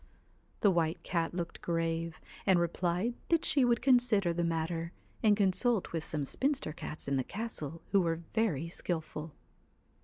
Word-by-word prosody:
The 205 - +6
White 170 -1 0
Cat 170 -1 -1
looked 170 -2 -4
grave, 165 -1 -1 0.3
and 190 -2 +6
replied 175 +6 0 0.2
that 330 -1 +3
she 280 -3 +3
would 240 -2 +2
consider 240 -9 +4
the 170 +1 0
matter, 165 0 -1 0.3
and 210 -2 +5
consult 205 +2 +2
with 165 -2 -2
some 150 -3 -2
spinster 270 - -1
cats 150 -1 -7
in 140 0 +1
the 130 - +1
castle 165 - -5
who 200 - +5
were 165 -1 -1
very 180 -9 +1
skilful. 160 -2 -4
170 Hz, 155 wpm, -32 LUFS, 165-215 Hz, 0.3 s, The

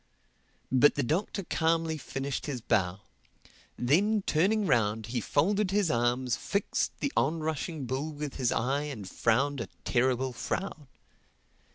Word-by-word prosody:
But 130 +3 +5
the 145 - 0
Doctor 185 - -1
calmly 165 -1 +1
finished 135 -1 -4
his 135 -4 -3
bow. 95 -5 0 0.8
Then 195 - +2
turning 200 +7 +2
round 110 - +2
he 120 +1 -2
folded 195 - +1
his 195 -3 +2
arms, 120 +1 +1
fixed 200 - -1
the 280 - -1
on 160 +4 +1
rushing 155 -1 -3
bull 135 +5 -2
with 150 -1 -5
his 125 -3 +1
eye 135 +5 0
and 120 -10 -6
frowned 130 +7 +1
a 110 - -4 0.2
terrible 130 +1 +1
frown. 155 +2 -4
140 Hz, 140 wpm, -29 LUFS, 120-165 Hz, 0.8 s, But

